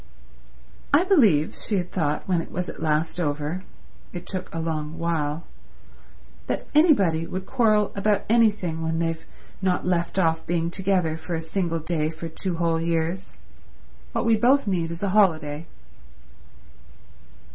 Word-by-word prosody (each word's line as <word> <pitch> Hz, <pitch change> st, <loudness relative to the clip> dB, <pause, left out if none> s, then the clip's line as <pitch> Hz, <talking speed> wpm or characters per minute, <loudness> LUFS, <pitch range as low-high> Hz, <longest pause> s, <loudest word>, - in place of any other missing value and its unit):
"I 295 Hz, +5 st, +5 dB
believe," 225 Hz, -, +4 dB
she 210 Hz, -, -2 dB
had 180 Hz, -1 st, -3 dB
thought 150 Hz, -5 st, -1 dB
when 180 Hz, -3 st, +2 dB
it -, -, -9 dB
was 180 Hz, 0 st, -3 dB
at -, -, -8 dB
last 160 Hz, +2 st, 0 dB
over—it 165 Hz, +3 st, -5 dB
took 185 Hz, -1 st, -4 dB
a -, -, -5 dB
long 160 Hz, -1 st, -3 dB
while—"that 160 Hz, -1 st, -6 dB
anybody 195 Hz, -, +4 dB
would 185 Hz, 0 st, -5 dB
quarrel 215 Hz, -4 st, +2 dB
about 200 Hz, 0 st, +1 dB
anything 210 Hz, -8 st, +2 dB
when 160 Hz, 0 st, -1 dB
they've 165 Hz, -1 st, -1 dB, 0.4 s
not 185 Hz, -2 st, 0 dB
left 175 Hz, 0 st, 0 dB
off 165 Hz, -3 st, +2 dB
being 170 Hz, 0 st, 0 dB
together 185 Hz, -4 st, 0 dB
for 160 Hz, +2 st, -4 dB
a -, -, -1 dB
single 165 Hz, +1 st, -2 dB
day 155 Hz, -1 st, -1 dB
for 165 Hz, +1 st, -7 dB
two 170 Hz, +2 st, -3 dB
whole 165 Hz, -1 st, +1 dB
years. 170 Hz, +3 st, -2 dB, 0.8 s
What -, -, -1 dB
we 230 Hz, -1 st, +5 dB
both 255 Hz, +6 st, +4 dB
need 175 Hz, -5 st, 0 dB
is 170 Hz, +3 st, -6 dB
a 200 Hz, -, +1 dB
holiday." 160 Hz, -6 st, +2 dB
170 Hz, 145 wpm, -24 LUFS, 160-195 Hz, 0.8 s, I